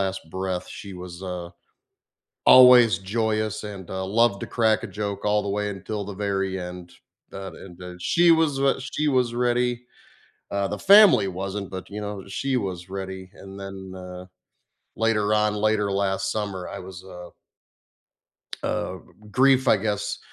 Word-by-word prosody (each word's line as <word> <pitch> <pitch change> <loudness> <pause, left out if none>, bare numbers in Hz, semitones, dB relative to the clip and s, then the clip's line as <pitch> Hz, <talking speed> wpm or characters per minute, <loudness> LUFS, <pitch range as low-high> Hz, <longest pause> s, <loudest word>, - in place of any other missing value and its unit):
last 95 0 -1
breath, 95 0 -3
she 100 - -9
was, 90 -1 -9
uh, 90 -2 -5 1.0
always, 125 -6 +8 0.2
joyous, 110 -2 0
and, 100 -4 -8
uh, 95 0 -3
loved 105 0 +2
to - - -5
crack 110 -2 +2
a - - -4
joke 100 -1 -3
all 105 0 +2
the 100 - -3
way 105 0 -1
until 100 +1 -5
the 100 - -6
very 95 -1 -1
end. 90 0 -8 0.4
That 95 0 -7
and, 90 -3 -12
uh, 90 -1 -8
she 170 - +3
was 160 -4 +2
wha 135 -1 +4
she 140 +3 -2
was 120 -2 +1
ready, 125 0 +1 0.8
uh, 100 -1 0
the - - -4
family 205 - +8
wasn't, 100 0 -4
but, 95 -1 -7
you 105 +1 -6
know, 105 0 -4
she 130 +7 -1
was 90 -2 -5 0.2
ready, 95 0 -6 0.2
and 95 - -11
then, 95 0 -7 0.3
uh, 90 0 -9 0.7
later 110 -2 +1 0.2
on, 105 - +2 0.2
later 105 -2 +1
last 95 0 0
summer, 100 -4 -3
I - - -7
was, 95 -1 -10
uh 90 -2 -10 1.3
Uh, - - -2
g - - -13 0.2
g - - -14
grief, 130 +2 +4
I - - +6
guess, 105 0 -2
100 Hz, 170 wpm, -24 LUFS, 95-115 Hz, 1.3 s, always